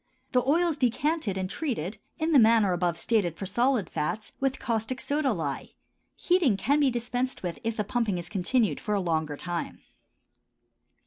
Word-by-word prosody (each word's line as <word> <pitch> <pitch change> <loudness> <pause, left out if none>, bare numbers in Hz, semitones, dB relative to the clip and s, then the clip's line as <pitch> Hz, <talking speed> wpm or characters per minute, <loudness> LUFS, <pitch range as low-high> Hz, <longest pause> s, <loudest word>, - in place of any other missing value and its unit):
The 250 - +3
oil 340 +5 +3
is 315 - -2
decanted 255 - 0
and 190 -1 -1
treated, 215 - -3 0.2
in 320 +1 0
the 290 - +7
manner 220 -4 +5
above 175 -1 0
stated 175 -4 0
for 195 - -4
solid 235 +1 +1
fats, 165 +8 -3
with 270 0 0
caustic 230 +2 -2
soda 285 -2 0
lye. 155 -9 -4 0.4
Heating 345 - +2
can 285 +8 +2
be 285 -2 +4
dispensed 245 +1 -2
with 175 -2 -4
if 225 -1 -2
the 210 - +1
pumping 215 -3 0
is 175 0 -5
continued 210 +4 +1
for 210 - -1
a - - +1
longer 160 -5 -1
time. 175 +1 -4
225 Hz, 175 wpm, -27 LUFS, 180-265 Hz, 0.4 s, the